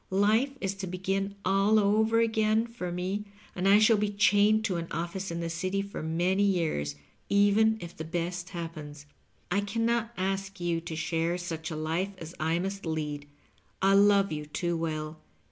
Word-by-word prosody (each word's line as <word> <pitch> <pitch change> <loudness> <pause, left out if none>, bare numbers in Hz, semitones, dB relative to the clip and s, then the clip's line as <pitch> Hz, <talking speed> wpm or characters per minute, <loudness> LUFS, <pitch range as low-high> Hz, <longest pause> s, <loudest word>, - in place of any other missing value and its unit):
Life 220 +8 +2
is 195 -1 -2
to 190 -1 -4
begin 195 +2 -2
all 195 +3 +3
over 220 +2 +3
again 220 0 +2
for 230 -7 -6
me, 185 +4 -3 0.3
and 185 +1 0
I 200 +1 +7
shall 215 +1 +5
be 210 0 0
chained 205 +1 +3
to 185 -4 0
an 165 0 -4
office 175 +3 -4
in 170 0 -3
the 170 - -2
City 185 +4 -1
for 200 - -7
many 175 +5 +1
years, 165 - 0 0.3
even 205 +2 +4
if 170 -3 -9
the 160 - -6
best 175 +2 -3
happens. 155 -4 -7 0.5
I 200 +3 +2
can 220 +3 -1
not 235 0 0
ask 195 +1 -2
you 170 -1 -1
to 165 -1 -6
share 165 +1 -1
such 165 -3 -5
a 160 - -4
life 165 +6 -1
as 165 -1 -9
I 160 +2 +1
must 195 +2 -3
lead 150 -3 -3 0.3
— - - -37
I 195 0 +5
love 200 0 +5
you 150 -1 -4
too 170 +3 -2
well. 155 -1 -3
190 Hz, 185 wpm, -29 LUFS, 165-205 Hz, 0.5 s, I